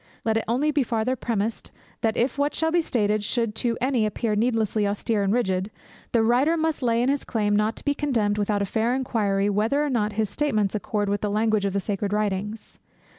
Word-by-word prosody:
Let 220 -1 +2
it 225 - 0
only 265 +7 +1
be 295 -1 +2
farther 235 +1 0
premised, 225 -2 -2 0.3
that 225 -1 0
if 245 +2 +1
what 285 +1 0
shall 320 +1 0
be 345 +1 +3
stated 215 -7 0
should 230 0 -1
to 235 -1 0
any 250 -4 +1
appear 215 +1 -2
needlessly 220 -2 +1
austere 205 +1 -1
and 195 0 +1
rigid, 190 -4 0 0.4
the 230 -2 +3
writer 260 +8 +3
must 320 -2 -1
lay 235 -1 +2
in 255 - +2
his 280 0 0
claim 210 -3 0
not 215 +2 +1
to - - -9
be 285 - +2
condemned, 225 -9 0
without 205 0 0
a - - 0
fair 225 +5 0
inquiry 205 -6 0
whether 220 +9 +1
or 290 - -2
not 215 -4 0
his 220 0 0
statements 215 -4 0
accord 210 -1 -1
with 205 +1 -1
the 210 - -1
language 215 0 +1
of 195 - -1
the 200 - +1
sacred 200 0 -2
writings. 210 +1 -3
220 Hz, 220 wpm, -24 LUFS, 205-250 Hz, 0.4 s, be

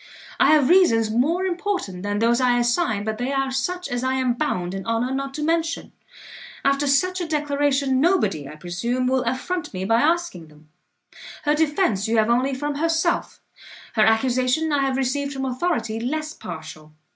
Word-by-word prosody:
I - - +5
have 300 -4 +5
reasons 230 -12 +4
more 310 +11 +1
important 365 - -3
than 205 +1 -2
those 235 +3 +2
I 245 -1 +3
assign, 240 - +1
but 220 +1 -3
they 250 +2 -2
are 270 -1 0
such 360 +8 -2
as 245 0 -3
I 260 0 0
am 260 -2 +1
bound 185 -10 -2
in 195 0 -5
honour 230 +3 0
not 275 0 -4
to 300 - -3
mention. 330 +1 -1 0.7
After 275 +1 +2
such 365 +7 +2
a 345 - -3
declaration, 285 -3 +1
nobody, 205 - +1
I - - -9
presume, 180 +10 -2
will 260 0 +2
affront 280 - -3
me 185 +1 -3
by 230 +3 +3
asking 320 - 0
them. 150 0 -20 0.7
Her 295 - +2
defence 295 - +1
you 225 +1 +1
have 220 +1 +3
only 260 +3 +1
from 290 +2 -3
herself, 330 +2 0 0.5
her 220 - +2
accusation 255 +7 +1
I 285 - +2
have 270 -1 0
received 280 +2 -1
from 270 0 -3
authority 255 -4 -1
less 305 +6 -3
partial. 160 - -10
265 Hz, 180 wpm, -23 LUFS, 225-305 Hz, 0.7 s, I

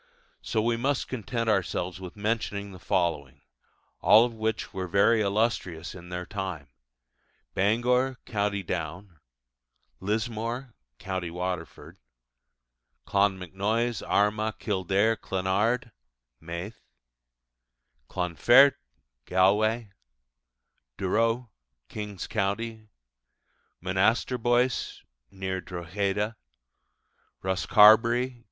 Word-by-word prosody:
So 110 -2 -1
we 115 0 +1
must 135 +3 0
content 115 -1 -3
ourselves 95 -3 0
with 90 -2 -8
mentioning 105 -1 -2
the 95 - -11
following, 80 -7 -1 0.6
all 110 +2 +7
of 120 - -5
which 110 -1 -3
were 95 -1 -3
very 100 +5 +4
illustrious 100 -5 -1
in 90 -1 -11
their 90 0 -4
time: 90 -8 -5 0.8
Bangor 125 +6 +2
(Co. 105 -2 0
Down), 85 +1 -5 0.8
Lismore 115 +4 -3 0.2
(Co. 95 +4 -3
Waterford), 90 -1 -5 1.1
Clonmacnoise, 100 +4 0
Armagh, 105 +1 +1
Kildare, 100 +2 +1
Clonard 105 +7 -1 0.5
(Meath), 85 +6 -7 1.3
Clonfert 120 - +5 0.5
(Galway), 105 +5 +2 1.1
Durrow 115 +4 0 0.4
(King's 105 -3 -6
Co.), 100 +1 0 1.3
Monasterboice 120 +6 +1 0.3
(near 95 -1 -4
Drogheda), 100 +5 -2 1.1
Rosscarbery 110 +6 +5
(Co. 120 - -20
100 Hz, 80 wpm, -27 LUFS, 95-115 Hz, 1.3 s, all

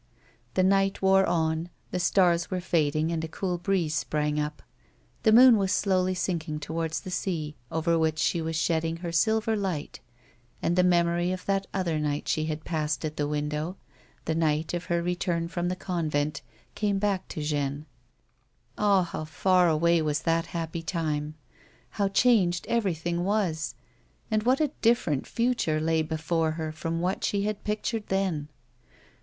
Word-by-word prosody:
The 185 - +3
night 195 +1 +2
wore 190 0 +5
on; 160 0 0 0.2
the 180 - -1
stars 175 -1 +3
were 185 - -1
fading, 160 -2 +1
and 165 -1 -2
a - - -2
cool 180 +2 -3
breeze 175 -4 0
sprang 150 -2 -1
up. 150 0 -4 0.6
The 220 - +4
moon 245 +1 +8
was 195 -2 0
slowly 185 -2 +1
sinking 165 -4 -2
towards 160 +1 -3
the 185 - -7
sea 160 -5 -2 0.2
over 165 +1 +1
which 160 -1 +1
she 170 +2 +1
was 160 0 -3
shedding 165 0 0
her 170 0 -5
silver 220 +5 +2
light, 185 -8 -3 0.6
and 175 - 0
the 180 - +5
memory 175 0 +2
of 185 0 -5
that 195 0 0
other 175 -5 -1
night 145 -1 -2
she 155 - 0
had 155 0 -4
passed 155 -1 -1
at 155 0 -4
the 145 -1 -1
window, 150 +4 -2 0.5
the 160 - 0
night 160 0 0
of 175 0 -3
her 170 -1 0
return 175 -1 -1
from 175 0 -2
the 180 - -1
convent, 155 -6 -2 0.3
came 205 -2 0
back 195 -2 0
to 155 - -5
Jeanne. 145 -1 -2 0.9
Ah! 200 -3 +4
how 170 -2 -5
far 180 +3 +3
away 170 +1 +3
was 150 0 -1
that 165 0 +1
happy 165 -1 -4
time! 155 -3 -2 0.6
How 200 +6 0
changed 195 -4 +3
everything 175 -6 0
was, 180 -7 -1 0.6
and 215 0 +2
what 255 +4 +2
a 300 -3 +1
different 225 - +2
future 235 -10 0
lay 160 0 +1
before 160 +1 -1
her 160 -1 -4
from 165 +1 -3
what 185 +2 -1
she 200 -1 0
had 210 0 -3
pictured 215 +1 -2
then 185 -7 -1
170 Hz, 165 wpm, -27 LUFS, 155-190 Hz, 0.9 s, moon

